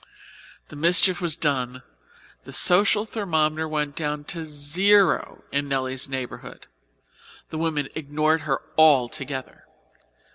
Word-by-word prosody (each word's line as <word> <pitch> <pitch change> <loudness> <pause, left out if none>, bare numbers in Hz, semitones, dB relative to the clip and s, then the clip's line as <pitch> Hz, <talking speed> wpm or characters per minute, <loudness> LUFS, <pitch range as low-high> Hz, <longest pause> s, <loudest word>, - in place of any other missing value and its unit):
The - - -11
mischief 175 +4 +3
was 170 -3 +1
done, 130 -6 -1 0.6
the - - -11
social 205 +3 +4
thermometer 160 -7 -1
went 150 -2 -3
down 150 -2 -3
to 165 -2 -6
zero 170 +6 +2
in 140 0 -1
Nelly's 130 -1 -3
neighbourhood. 130 -2 -7 0.9
The 155 - -4
women 155 -4 -1
ignored 155 +1 0
her 135 -2 -2 0.2
altogether. 135 -2 +1
155 Hz, 110 wpm, -24 LUFS, 140-165 Hz, 0.9 s, social